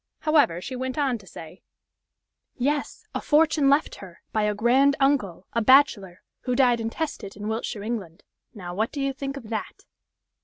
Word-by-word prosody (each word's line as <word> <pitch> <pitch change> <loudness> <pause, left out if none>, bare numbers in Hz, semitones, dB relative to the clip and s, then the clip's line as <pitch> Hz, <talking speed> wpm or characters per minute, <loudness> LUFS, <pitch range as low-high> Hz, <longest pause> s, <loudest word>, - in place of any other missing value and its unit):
However, 295 - +3
she 255 - -6
went 260 +2 -4
on 270 -5 0
to 195 - -18
say: 165 +1 -11 1.0
"Yes! 285 +3 -2
a - - -3
fortune 300 -2 +3
left 285 +3 +2
her, 185 -3 -13
by 215 - +1
a 210 0 0
grand 260 +6 +3
uncle, 255 -11 +1
a 230 - +1
bachelor, 210 -8 +3 0.2
who 250 - -2
died 245 -2 +3
intestate 225 -2 -4
in 210 0 -6
Wiltshire, 220 -1 -3
England. 205 -7 -5 0.3
Now, 175 -4 -7
what 220 +5 -1
do 290 - -6
you 275 0 -1
think 275 +1 -5
of 230 -5 -10
that!" 220 - -5
240 Hz, 170 wpm, -25 LUFS, 205-275 Hz, 1.0 s, However